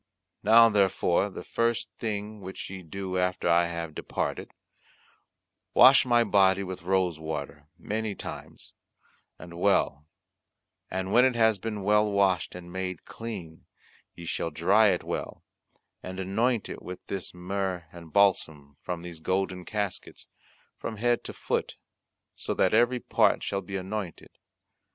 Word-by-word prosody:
Now 115 +2 +7
therefore 100 -2 +2
the 95 - -8
first 115 0 0
thing 105 -1 -4
which 95 0 -7
ye 95 -1 -7
do 95 +2 -4
after 90 -1 0
I 85 0 +4
have 85 -2 -5
departed, - - -4 1.2
wash 130 0 +8
my 120 -1 +5
body 100 -2 +3
with 95 -2 -6
rose 90 -2 0
water 75 -2 -6
many 110 -1 -3
times - - -9 0.6
and 85 -1 -10
well, 90 -6 +1 0.8
and 95 +1 -3
when 125 - +7
it 130 -1 +3
has 110 -3 +3
been 105 -1 -4
well 105 +1 +3
washed 95 -5 +1
and 85 -1 -10
made 95 -2 -4
clean, 95 -9 -8 0.5
ye 85 - -9
shall 85 - -2
dry 85 +8 +4
it 90 -3 +1
well, - - -5 0.6
and 95 0 -7
anoint 110 +5 0
it - - -7
with 90 0 -9
this 95 -2 -5
myrrh 90 -1 -3
and 85 -3 -12
balsam, 80 -8 +1
from 85 -1 -5
these 85 -2 -8
golden 95 +1 -1
caskets, 105 -3 -4 0.5
from 110 - -5
head 120 +2 +1
to - - -5
foot, - - -2 0.6
so - - -3
that - - +2
every 120 +3 +3
part - - +2
shall 100 -1 -2
be 95 +1 -7
anointed. 95 -2 -5
95 Hz, 145 wpm, -28 LUFS, 90-105 Hz, 1.2 s, wash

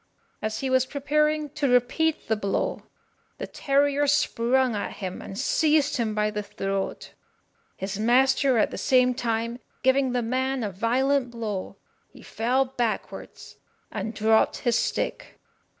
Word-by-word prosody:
As 215 0 -3
he 265 - -1
was 260 0 +3
preparing 300 +1 0
to 295 -2 -1
repeat 250 +6 +1
the 220 - +2
blow, 200 -2 -2 0.6
the - - -4
terrier 285 0 +1
sprung 260 -3 +2
at 205 - -3
him, 185 -2 -6
and 195 - -8
seized 295 +3 +2
him 220 -3 -1
by 210 0 +1
the 210 0 -3
throat. 195 -1 -4 0.6
His 195 +1 -4
master, 260 +3 +3
at 215 - +2
the - - -5
same 250 -1 +3
time, 235 0 -2 0.2
giving 260 0 +3
the 245 -1 0
man 260 +2 -1
a 205 - -2
violent 250 +6 +1
blow, 220 -5 -5 0.3
he - - -16
fell 250 +4 0
backwards 245 -3 -4 0.3
and 220 +2 -4
dropped 220 +1 +3
his 240 -2 +1
stick. - - -2
250 Hz, 145 wpm, -25 LUFS, 220-275 Hz, 0.6 s, was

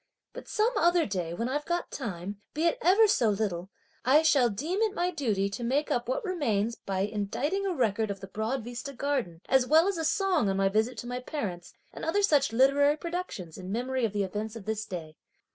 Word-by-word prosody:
But - - -9
some 450 +3 +1
other 345 -3 +4
day 180 -5 -3
when 230 +6 -2
I've 290 +3 -1
got 345 0 -2
time, 200 -4 -5
be 310 - -1
it 335 - +2
ever 400 +5 +6
so 245 - +3
little, 195 -4 -2 0.3
I 290 +5 +5
shall 275 -6 +4
deem 315 - -2
it 440 -2 +1
my 360 -2 0
duty 220 - 0
to 235 - -5
make 275 +5 0
up 240 - -1
what - - -1
remains 235 - 0
by 190 -3 -3
inditing 255 - -2
a 370 - -1
record 220 -4 +1
of 200 -1 -4
the 195 - -7
Broad 220 +6 -3
Vista 245 +4 -6
Garden, 250 -11 -2
as 265 -1 +3
well 320 +5 +5
as 395 -4 -1
a - - -1
song 360 - +2
on 195 - 0
my 195 0 +3
visit 220 +5 0
to - - -6
my 245 0 -3
parents 205 - -5 0.2
and - - -8
other 405 +6 +1
such 290 - +3
literary 280 +5 +4
productions 335 - -5
in 185 0 -6
memory 255 +3 -1
of 225 - +1
the 205 0 0
events 210 +3 -4
of 220 -4 -9
this 220 0 -2
day. 160 -5 -7
250 Hz, 220 wpm, -29 LUFS, 205-320 Hz, 0.3 s, ever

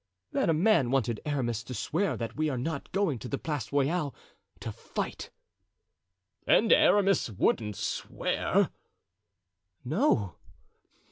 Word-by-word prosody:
"That - - +2
man 165 - +3
wanted 120 -4 0
Aramis 120 -6 -1
to 125 +4 -7
swear 180 - -1
that 115 -1 -5
we 155 0 0
are 130 - -2
not 140 +3 -4
going 185 - 0
to 125 - -7
the 140 - -2
Place 145 -8 -4
Royale 145 +1 0 0.5
to - - -4
fight." - - -5 1.2
"And 225 - +5
Aramis 195 -8 +4
wouldn't 105 +1 0
swear?" - - 0 1.1
"No." 125 - +1
140 Hz, 120 wpm, -29 LUFS, 120-170 Hz, 1.2 s, And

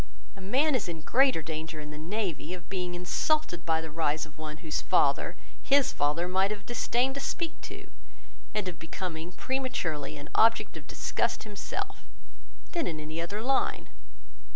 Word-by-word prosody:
A 195 - -11
man 270 +11 +3
is 245 -8 +1
in 165 -2 -4
greater 255 - +4
danger 160 0 -4
in 150 0 -7
the 150 - -7
navy 180 -1 -2
of 175 - -12
being 180 -2 -1
insulted 180 - +1
by 160 -1 +3
the 160 -1 -6
rise 155 -1 +1
of 155 -1 -15
one 155 -1 -5
whose 155 - 0
father, - - +3 0.2
his 275 -1 +4
father 150 +5 +1
might 190 +2 +3
have 210 -1 -4
disdained 240 +2 +1
to 275 - -4
speak 335 +3 -2
to, - - -8 0.6
and 210 -3 -1
of 170 -3 -4
becoming 165 0 -4
prematurely 175 - -1
an 145 0 -8
object 225 +1 +5
of - - -9
disgust - - 0
himself, 210 -2 -4 0.7
than 340 -3 0
in 155 -2 -2
any 155 +2 -4
other 200 +6 -3
line. 270 +2 +1
180 Hz, 170 wpm, -30 LUFS, 160-230 Hz, 0.7 s, object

